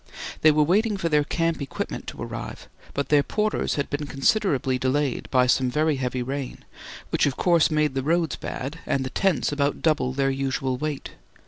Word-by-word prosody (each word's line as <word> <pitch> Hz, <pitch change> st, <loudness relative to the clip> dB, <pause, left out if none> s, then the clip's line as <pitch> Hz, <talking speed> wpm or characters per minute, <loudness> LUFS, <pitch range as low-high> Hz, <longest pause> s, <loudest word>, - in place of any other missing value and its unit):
They 155 Hz, -, +7 dB
were 150 Hz, 0 st, +4 dB
waiting 205 Hz, +6 st, +2 dB
for 170 Hz, -3 st, -1 dB
their 150 Hz, -1 st, +3 dB
camp 165 Hz, +1 st, -1 dB
equipment 140 Hz, -, -5 dB
to -, -, -7 dB
arrive, -, -, -7 dB, 0.3 s
but 140 Hz, -, -2 dB
their 150 Hz, -1 st, +5 dB
porters 215 Hz, +8 st, -1 dB
had 140 Hz, -, -1 dB
been 145 Hz, 0 st, -2 dB
considerably 135 Hz, -, +1 dB
delayed 135 Hz, +1 st, 0 dB
by 125 Hz, -1 st, +4 dB
some 125 Hz, 0 st, +2 dB
very 150 Hz, +2 st, +1 dB
heavy 125 Hz, -1 st, -2 dB
rain, 135 Hz, +1 st, -5 dB, 0.5 s
which -, -, +3 dB
of 135 Hz, -, -2 dB
course 170 Hz, -3 st, +4 dB
made 155 Hz, -3 st, +1 dB
the 135 Hz, -, -1 dB
roads 165 Hz, +2 st, +1 dB
bad 140 Hz, +6 st, -5 dB
and 135 Hz, -, +1 dB
the 130 Hz, -, -5 dB
tents 185 Hz, -11 st, +1 dB
about 145 Hz, 0 st, -1 dB
double 150 Hz, -5 st, +2 dB
their 135 Hz, 0 st, +1 dB
usual 135 Hz, -1 st, -1 dB
weight. 150 Hz, +1 st, -4 dB
145 Hz, 190 wpm, -25 LUFS, 135-160 Hz, 0.5 s, They